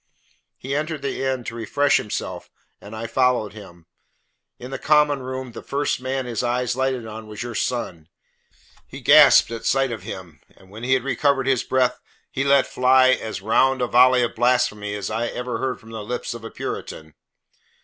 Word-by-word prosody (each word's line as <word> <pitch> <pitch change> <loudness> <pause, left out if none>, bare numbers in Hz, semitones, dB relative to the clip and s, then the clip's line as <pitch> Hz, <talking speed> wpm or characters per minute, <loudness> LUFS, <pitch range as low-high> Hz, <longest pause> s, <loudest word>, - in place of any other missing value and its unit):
He 135 +2 -4
entered 155 0 -3
the 140 - -3
inn 130 -2 -1
to 115 - -6
refresh 120 +5 +1
himself 105 - -5 0.3
and 100 +3 -10
I 110 +1 -5
followed 120 -3 +1
him. 85 -6 -13 0.7
In 125 +2 -9
the 135 - -5
common 150 -2 +3
room 130 0 -6
the - - -9
first 140 -2 -2
man 130 0 -2
his 120 -2 -3
eyes 125 0 -1
lighted 130 -2 -1
on 110 0 -8
was 105 0 -6
your 120 -1 -6
son. 90 -10 -3 0.8
He - - -10
gasped - - +7
at 115 -1 -6
sight 135 -1 +1
of 110 -4 -5
him, 90 -4 -9 0.2
and 95 0 -20
when 110 +2 -10
he 130 +2 +1
had 130 - -1
recovered 140 0 +1
his 130 -3 +2
breath 125 -1 +1 0.3
he 135 - -1
let 140 -1 +4
fly 130 +1 +4
as 110 -6 -1
round 130 +5 +3
a 125 - +1
volley 125 +1 +5
of 120 - -2
blasphemy 110 -4 +1
as 105 +1 -4
ever 120 +2 -3
I - - -7
heard 130 -1 -2
from 110 - -15
the 110 -1 -6
lips 125 +2 -4
of 120 -2 -9
a 115 - -6
Puritan. 80 -1 -7
125 Hz, 190 wpm, -22 LUFS, 110-130 Hz, 0.8 s, gasped